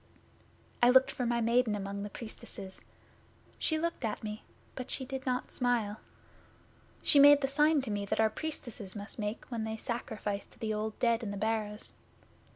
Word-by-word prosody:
I 240 - +7
looked 260 +1 +6
for 250 -2 -2
my 235 0 +1
Maiden 230 -1 +3
among 200 0 -4
the 205 - -4
Priestesses. 195 -3 -8 0.8
She 315 - +1
looked 335 -3 -2
at 220 -1 -2
me, 210 0 -5 0.3
but 255 - -6
she 265 - -2
did 265 0 -5
not 250 0 -1
smile. 235 -4 +1 1.0
She 285 - +6
made 290 0 +9
the 270 - +2
sign 295 +1 +3
to 235 - -4
me 205 -1 -1
that - - -1
our 220 -1 +4
Priestesses 240 -9 -5
must 205 +2 -7
make 210 +1 -3
when 230 -2 -2
they 220 0 -3
sacrifice 215 -4 -3
to - - -22
the 220 -2 -2
Old 215 0 -3
Dead 235 -1 +2
in 220 - -4
the 200 - -4
Barrows. 215 0 -1
225 Hz, 180 wpm, -32 LUFS, 210-255 Hz, 1.0 s, made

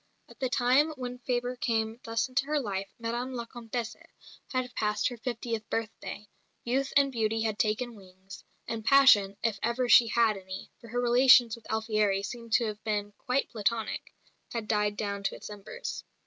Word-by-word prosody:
At - - -17
the 260 -2 0
time 255 +5 +3
when 250 -2 -6
Fabre 245 0 -2
came 225 -4 -1
thus 230 +3 -1
into 270 +2 -1
her 300 0 +1
life 195 -6 -3
Madame 240 +3 -3
la 235 -1 -4
Comtesse 235 0 -5 0.6
had 255 -1 -2
passed 210 0 0
her 245 - -8
fiftieth 230 -2 -4
birthday 220 -1 -4 0.4
youth 265 +3 0
and 275 -1 +4
beauty 225 -2 0
had 220 -1 -1
taken 230 +3 0
wings; 190 -1 -13 0.2
and 225 -1 -4
passion 215 -7 +6
(if 220 -4 0
ever 235 +2 0
she 235 -1 +7
had 225 -2 +2
any 190 0 -8
for 235 - -13
her 245 +2 -2
relations 245 -1 +6
with 230 - -11
Alfieri 215 -3 +1
seem 230 +3 -7
to 230 +1 +3
have 210 -1 -5
been 205 -1 -2
quite 255 +2 -1
platonic) 225 +1 -2 0.4
had 230 -3 -4
died 210 -1 +1
down 200 -1 -3
to 195 - -2
its - - -9
embers. 210 - -7
230 Hz, 175 wpm, -29 LUFS, 210-245 Hz, 0.6 s, she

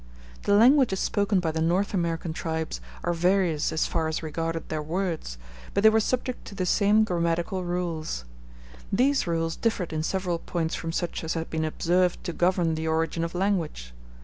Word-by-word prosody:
The 205 - +4
languages 240 -2 +5
spoken 200 -2 +1
by 165 -3 0
the 160 0 -2
North 180 +6 +1
American 170 -3 -1
tribes 160 -1 -3 0.2
are 175 - +1
various 175 -2 +2
as 160 - +1
far 160 -1 -1
as 160 +1 -2
regarded 165 +1 -3
their 155 -1 -2
words, 160 - -3 0.4
but 200 - +2
they 220 - +8
were 220 - +4
subject 255 +2 -1
to 200 - -9
the 185 -2 -1
same 210 +3 +4
grammatical 175 0 -1
rules. 170 - -3 0.7
These 265 +3 +2
rules 165 -1 0
differed 200 -8 -1
in 155 - -1
several 180 0 -1
points 165 -2 -2
from 165 - -3
such 175 0 -2
as 160 - -2
had 165 0 -4
been 160 0 0
observed 175 +3 +1
to 175 - -3
govern 175 -2 +2
the 160 0 -2
origin 165 +1 0
of 165 +1 -4
language. 175 - -1
170 Hz, 180 wpm, -26 LUFS, 160-195 Hz, 0.7 s, they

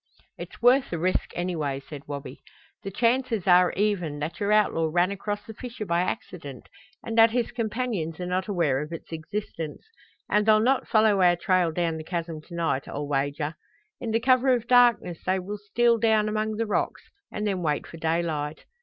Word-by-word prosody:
"It's - - -10
worth 255 +2 +5
the 170 - -3
risk 180 +3 0
anyway," 160 -6 -2
said 140 0 -11
Wabi. 145 -1 -7 0.4
"The 195 - -5
chances 230 0 +1
are 180 -1 +5
even 190 -7 0
that 150 +3 -5
your 205 0 0
outlaw 195 -6 +3
ran 175 +3 +2
across 205 +1 -4
the 220 - -9
fissure 235 -1 -7
by 170 -1 +1
accident 160 - -5 0.3
and 225 - -4
that 225 0 +8
his 240 0 -1
companions 220 -8 -3
are 180 - -3
not 185 +1 -1
aware 165 -9 +1
of 150 +2 -7
its 165 - -8
existence. 160 -1 -5 0.4
And 210 +1 +2
they'll 215 0 +6
not 255 +4 +2
follow 215 -3 +4
our 175 -1 +5
trail 180 -1 +1
down 165 -1 -1
the 155 - -6
chasm 165 -2 -4
to 170 - -11
night, 165 -5 -1
I'll 145 0 -4
wager. 145 +2 -1 0.5
In 235 - -4
the 225 +1 +2
cover 255 +2 +3
of 235 -2 -4
darkness 240 -8 +4
they 185 +1 +1
will 200 +3 -5
steal 230 +3 +2
down 220 -2 +3
among 215 0 -1
the 225 +1 -1
rocks 210 - -1 0.3
and 210 - -3
then 195 -3 -1
wait 150 -3 -1
for 165 - -11
daylight. 160 -2 -2
185 Hz, 190 wpm, -26 LUFS, 160-220 Hz, 0.5 s, that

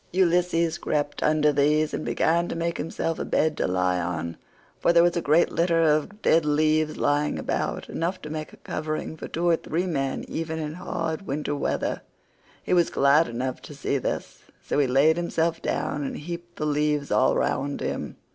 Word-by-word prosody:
Ulysses 175 -2 +2
crept 145 -1 -2
under 150 -1 +3
these 150 +2 +2
and - - -2
began 170 +1 +1
to - - -4
make 170 0 -2
himself 165 +1 -2
a - - -1
bed 155 0 +1
to - - 0
lie 90 -1 +1
on, 85 -1 -3 0.4
for - - +3
there 170 0 +6
was 175 0 +3
a 170 - 0
great 160 +3 +3
litter 165 -1 +2
of 160 +7 +1
dead 165 0 +4
leaves 155 +1 +2
lying 145 +1 +1
about—enough 175 +3 -2
to 150 - -6
make 155 -1 -5
a - - -15
covering 155 0 -4
for - - -7
two 170 +2 -2
or 170 -1 +4
three 170 +4 -2
men 135 -6 -2
even 160 0 -3
in 155 -1 -4
hard 175 0 -4
winter 145 +1 -2
weather. - - -1 0.6
He - - -1
was 175 -2 +4
glad 140 +4 +4
enough 125 +2 -3
to 145 - -10
see 140 0 -1
this, - - -4 0.3
so - - +1
he 140 - +3
laid 140 +6 +4
himself 165 -1 0
down 145 - -2
and 135 - -4
heaped 175 +2 -7
the 150 - -3
leaves 150 -1 0
all 130 - +3
round 140 0 -1
him. - - -4
155 Hz, 190 wpm, -25 LUFS, 145-170 Hz, 0.6 s, there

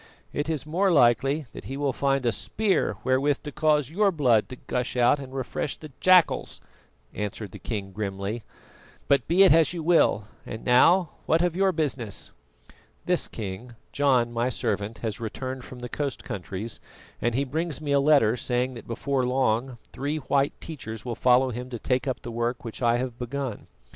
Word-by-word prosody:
"It 145 +2 -2
is 155 -4 -2
more 185 +5 +1
likely 135 +1 +3
that - - -9
he 135 - -5
will 140 -2 0
find 135 -1 0
a 120 - +3
spear 200 - 0
wherewith 135 +2 +1
to 150 - -6
cause 150 -1 +2
your 200 +3 +3
blood 125 - +2
to 130 - -7
gush 125 0 -3
out 125 +4 +4
and 135 -2 -8
refresh 135 +1 -3
the 155 -2 -11
jackals," 185 -2 +4 0.5
answered 105 -1 -4
the - - -10
king 100 -4 -4
grimly; 100 +2 -4 0.7
"but 140 - +3
be 180 +4 +6
it 190 - +7
as 160 -1 +4
you 170 -2 -4
will. 165 -10 +4 0.2
And 110 - -8
now, 165 +8 +5 0.2
what 165 +2 +3
of 175 -2 0
your 190 +1 +3
business?" 135 - -3 0.7
"This, - - +2
King: 110 +4 -7 0.2
John, 125 -4 +2
my 120 +2 0
servant, 105 -2 -2
has 110 +2 -3
returned 130 +3 -5
from 130 - -10
the 125 - -4
coast 140 +1 -3
countries, 100 +4 -5 0.4
and 120 0 0
he 135 - +2
brings 155 +1 -2
me 150 -2 -3
a 140 - +4
letter 140 -6 +4
saying 125 +1 -1
that 120 - -10
before 130 +3 -1
long 125 -1 0 0.2
three 145 +3 -2
white 140 0 0
teachers 115 -9 -7
will 120 - -2
follow 125 +2 +3
him 125 +2 -6
to 120 - -5
take 125 +3 -1
up 130 - -3
the 120 - -6
work 120 +2 -2
which 115 - -7
I 120 -1 +3
have 125 -1 -4
begun. 125 -2 -4
130 Hz, 185 wpm, -26 LUFS, 120-145 Hz, 0.7 s, it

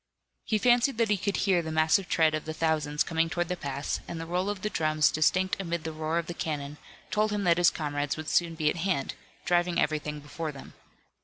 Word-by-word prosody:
He 215 - +1
fancied 245 +2 +3
that 230 -2 +2
he - - +5
could 200 +1 -1
hear 185 -4 +3
the 160 -1 -5
massive 160 +4 +2
tread 160 -1 +3
of 155 - -2
the 155 0 -5
thousands 155 -2 +1
coming 165 0 0
toward 175 0 -2
the 180 - -1
pass, 140 -3 -3
and 170 - -5
the 165 - -5
roll 180 +4 -1
of 205 -2 -4
the 210 - 0
drums, 155 -2 +2
distinct 185 +5 +1
amid 170 -3 -3
the 160 - -4
roar 155 +1 -2
of 170 - -1
the 175 - -5
cannon, 150 -3 -4 0.3
told 215 +1 +2
him 205 -1 -1
that 175 -1 +3
his 175 - +6
comrades 145 -2 -2
would 155 -1 -6
soon 170 +1 +1
be 155 -2 -1
at - - -6
hand, 170 -6 -1 0.3
driving 175 0 +2
everything 150 0 -1
before 155 +2 -5
them. 135 -2 -12
165 Hz, 230 wpm, -28 LUFS, 155-180 Hz, 0.3 s, his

